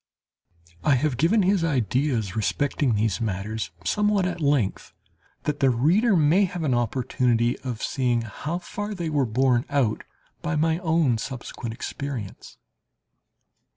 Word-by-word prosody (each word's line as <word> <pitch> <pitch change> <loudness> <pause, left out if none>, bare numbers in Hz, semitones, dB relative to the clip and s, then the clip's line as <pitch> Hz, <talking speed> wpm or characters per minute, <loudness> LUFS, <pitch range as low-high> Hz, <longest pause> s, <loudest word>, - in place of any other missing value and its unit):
I 140 - +4
have 135 +1 0
given 175 - +3
his 190 -1 +2
ideas 125 - 0
respecting 130 +3 0
these 105 -3 0
matters 105 +1 -3 0.2
somewhat 210 -2 +2
at 175 -2 -3
length, 140 -9 0 0.5
that 150 -1 -2
the 135 -2 +4
reader 175 - +3
may 165 +5 +4
have 175 -2 -4
an 140 -5 +1
opportunity 120 0 +1
of 125 -4 -5
seeing 125 -4 0
how 150 - -4
far 205 +3 -5
they 170 -4 -3
were 140 -4 +1
borne 125 +1 +2
out 130 -7 +1 0.4
by 170 -2 -2
my 160 +2 +1
own 160 -9 +2
subsequent 120 -2 -6
experience. 130 -6 -6
135 Hz, 135 wpm, -25 LUFS, 120-165 Hz, 0.5 s, I